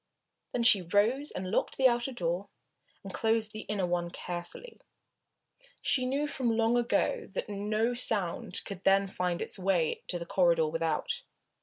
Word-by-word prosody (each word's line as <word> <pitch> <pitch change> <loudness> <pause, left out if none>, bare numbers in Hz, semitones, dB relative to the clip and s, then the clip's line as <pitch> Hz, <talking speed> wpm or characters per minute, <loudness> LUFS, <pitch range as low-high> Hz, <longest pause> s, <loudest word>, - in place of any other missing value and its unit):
Then 240 - 0
she 210 -5 +6
rose 215 - +1
and 185 0 -5
locked - - 0
the 265 - +6
outer 240 +1 +1
door 180 -3 -2 0.5
and 195 -1 -8
closed 225 -1 +1
the 215 0 -7
inner 200 -3 0
one 175 -1 -1
carefully. 175 - -7 1.0
She 255 -2 +2
knew 280 +3 0
from 250 -6 0
long 230 +1 +3
ago 260 - +1
that - - -3
no 215 +4 0
sound 205 -8 -1
could 195 -1 -7
then 195 +1 +4
find 180 -2 -2
its - - -5
way 180 -4 +1
to 180 - -1
the 170 - -6
corridor 170 -3 +3
without. 165 0 -1
205 Hz, 160 wpm, -30 LUFS, 175-240 Hz, 1.0 s, she